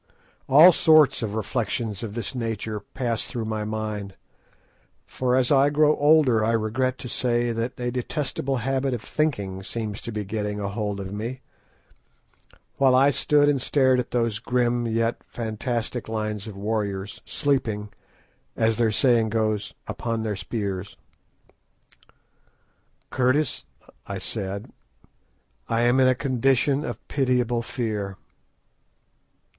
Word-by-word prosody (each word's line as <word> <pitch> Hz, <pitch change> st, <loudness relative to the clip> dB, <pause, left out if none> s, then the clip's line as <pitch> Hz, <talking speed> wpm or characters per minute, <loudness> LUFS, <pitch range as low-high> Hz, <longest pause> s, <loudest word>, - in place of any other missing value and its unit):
All 155 Hz, +7 st, +9 dB
sorts 155 Hz, -5 st, +5 dB
of 110 Hz, -2 st, -3 dB
reflections 110 Hz, -1 st, -2 dB
of 110 Hz, -3 st, -6 dB
this 115 Hz, -4 st, -3 dB
nature 110 Hz, -3 st, -3 dB
passed 120 Hz, 0 st, -3 dB
through 115 Hz, -2 st, -4 dB
my 110 Hz, -1 st, -3 dB
mind—for 110 Hz, +4 st, -6 dB
as 130 Hz, -1 st, +2 dB
I 140 Hz, 0 st, +5 dB
grow 150 Hz, +1 st, +4 dB
older 145 Hz, -7 st, +4 dB
I 115 Hz, +1 st, +2 dB
regret 115 Hz, +4 st, 0 dB
to -, -, -7 dB
say 120 Hz, -1 st, 0 dB
that 115 Hz, +3 st, -3 dB
a 120 Hz, 0 st, -1 dB
detestable 135 Hz, +1 st, -2 dB
habit 135 Hz, +2 st, 0 dB
of 110 Hz, -, -7 dB
thinking 100 Hz, -13 st, -2 dB
seems 105 Hz, +1 st, -4 dB
to 115 Hz, -, -6 dB
be 105 Hz, -1 st, -4 dB
getting 105 Hz, 0 st, -3 dB
a 100 Hz, -1 st, -2 dB
hold 105 Hz, -1 st, -3 dB
of 95 Hz, 0 st, -6 dB
me—while 130 Hz, +3 st, -5 dB
I 135 Hz, +2 st, +5 dB
stood 145 Hz, +1 st, +3 dB
and 140 Hz, -3 st, +2 dB
stared 130 Hz, -1 st, +3 dB
at 125 Hz, -, -3 dB
those 115 Hz, -4 st, 0 dB
grim 120 Hz, 0 st, 0 dB
yet 115 Hz, +1 st, 0 dB
fantastic 115 Hz, +1 st, -3 dB
lines 110 Hz, -1 st, -3 dB
of 105 Hz, -3 st, -8 dB
warriors, 100 Hz, -1 st, -3 dB
sleeping, 120 Hz, -8 st, -1 dB, 0.7 s
as 110 Hz, -1 st, +2 dB
their 115 Hz, -2 st, +3 dB
saying 115 Hz, 0 st, +3 dB
goes, 110 Hz, -2 st, -1 dB
"upon 115 Hz, -2 st, -3 dB
their 105 Hz, -2 st, -2 dB
spears." 100 Hz, -1 st, -4 dB, 2.1 s
"Curtis," 130 Hz, +2 st, +1 dB, 0.4 s
I -, -, -4 dB
said, 100 Hz, +1 st, -4 dB, 1.0 s
"I 115 Hz, 0 st, +1 dB
am 120 Hz, +2 st, +3 dB
in 130 Hz, -, +5 dB
a 130 Hz, -, +4 dB
condition 135 Hz, +2 st, +1 dB
of 120 Hz, -2 st, -6 dB
pitiable 125 Hz, -3 st, +1 dB
fear." 105 Hz, -6 st, -3 dB
115 Hz, 130 wpm, -24 LUFS, 105-130 Hz, 2.1 s, All